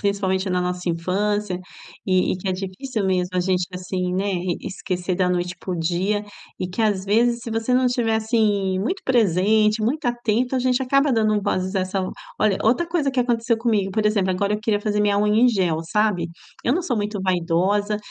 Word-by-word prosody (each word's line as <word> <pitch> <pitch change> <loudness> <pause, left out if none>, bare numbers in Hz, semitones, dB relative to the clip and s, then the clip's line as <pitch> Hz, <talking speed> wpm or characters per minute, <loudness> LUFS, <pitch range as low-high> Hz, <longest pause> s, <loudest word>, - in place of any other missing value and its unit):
principalmente 195 -1 0
na 180 0 +1
nossa 180 0 -2
infância 190 +3 -1 0.5
e 185 -1 +2
e - - -2
que 190 - -4
é - - +1
difícil 195 +5 -4
mesmo 185 -1 0
a 180 - +2
gente, 180 -1 0
assim, 180 0 -3
né, 200 +2 0
e 180 -1 -1
esquecer 185 -1 -3
da 185 -1 +2
noite 180 0 -1
para 185 - -5
o 175 - -2
dia 185 +5 0 0.3
e 185 - -3
que 185 +5 -5
às 205 -3 +1
vezes 235 +4 +2
se 230 - -6
você 225 +3 0
não 255 0 +3
estiver, 240 -2 +1
assim, 215 -4 +1
muito 315 - -2
presente, 215 -1 +3
muito 270 +8 -1
atento, 240 +1 0
a 260 - +2
gente 255 0 +1
acaba 275 +2 +2
dando 215 -3 +2
vozes 185 +1 -1
a 190 - +2
essa 185 +1 -2 0.4
olha, 215 -2 +2
outra 245 +10 +2
coisa 320 -5 0
que 265 - -4
aconteceu 235 -2 +1
comigo, 215 -5 +1
por 215 +2 0
exemplo, 200 -3 +1
agora 200 +3 0
eu 210 - -1
queria 215 -2 0
fazer 210 0 0
minha 205 -1 +2
unha 210 +3 +3
em 250 - +7
gel, 180 -8 +1
sabe? 185 -1 0 0.3
Eu 245 - +2
não 340 - +1
sou 265 -9 -1
muito 205 -1 -2
vaidosa 190 +3 +1
205 Hz, 210 wpm, -22 LUFS, 185-225 Hz, 0.5 s, em